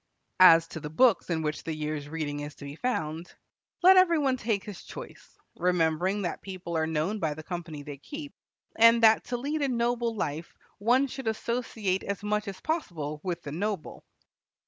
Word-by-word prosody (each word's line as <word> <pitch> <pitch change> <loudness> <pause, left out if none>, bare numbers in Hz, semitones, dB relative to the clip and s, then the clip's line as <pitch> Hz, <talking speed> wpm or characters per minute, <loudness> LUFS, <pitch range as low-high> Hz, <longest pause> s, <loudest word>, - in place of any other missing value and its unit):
As 165 -3 +8
to 160 - -6
the 150 - -6
books 225 +7 +3
in 160 -2 0
which 150 0 -3
the 160 -1 -3
year's 150 -1 -4
reading 150 -2 -3
is 145 0 -6
to 140 - -10
be 140 +1 -7
found, 165 -7 -3 0.5
let 375 +1 +8
every 355 -3 +5
one 275 -3 +2
take 220 -5 -1
his 205 -3 -8
choice, - - -11 0.2
remembering 180 +3 +1
that 175 - -3
people 185 -3 -6
are 160 0 +1
known 160 +7 -1
by 155 -4 -1
the 155 - -9
company 165 -4 -6
they 145 -1 -8
keep, 290 - -8 0.4
and 230 +1 +6
that 220 0 +6
to 245 - -2
lead 290 +5 -2
a 280 - +2
noble 235 -2 0
life 160 -4 -4 0.2
one 245 +6 +3
should 265 -2 -7
associate 220 -4 -1
as 200 0 -4
much 210 0 -1
as 195 -1 -6
possible 160 - -3
with 180 -2 -3
the 145 - -6
noble. 195 +2 -4
185 Hz, 190 wpm, -28 LUFS, 160-235 Hz, 0.5 s, As